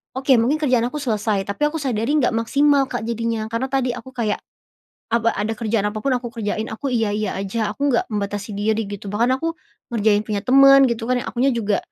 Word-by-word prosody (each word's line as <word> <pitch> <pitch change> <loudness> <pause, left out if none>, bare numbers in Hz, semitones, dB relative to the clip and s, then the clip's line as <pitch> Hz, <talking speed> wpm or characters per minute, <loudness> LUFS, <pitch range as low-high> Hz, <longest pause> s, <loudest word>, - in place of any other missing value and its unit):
oke 265 +1 0
mungkin 260 +7 +2
kerjaan 250 -5 +2
aku 300 - -6
selesai 210 -5 0
tapi 200 - -5
aku 300 - -5
sadari 240 -1 -1
enggak 245 -4 +2
maksimal 280 +4 +3
Kak - - -3
jadinya 230 -1 -2
karena 230 +4 -1
tadi 265 -2 +1
aku 260 - -10
kayak 215 -4 -1 0.7
apa 230 0 +2
ada 210 +2 -2
kerjaan 220 -2 0
apa 215 +1 -5
pun 270 - +2
aku 245 -1 -2
kerjain 220 -1 -3
aku 220 +6 -4
iya-iya 215 -2 0
aja 210 +2 -2
aku 285 +6 0
enggak 240 - +1
membatasi 205 +1 -3
diri 220 +1 0
gitu 205 0 -7
bahkan 235 +5 +1
aku, 330 0 -1 0.4
ngerjain 210 -2 +2
punya 205 -2 -1
temen 275 +1 +7
gitu 230 -1 -2
kan 255 - +2
akunya 255 +3 +1
juga 210 -4 0
230 Hz, 200 wpm, -21 LUFS, 210-260 Hz, 0.7 s, temen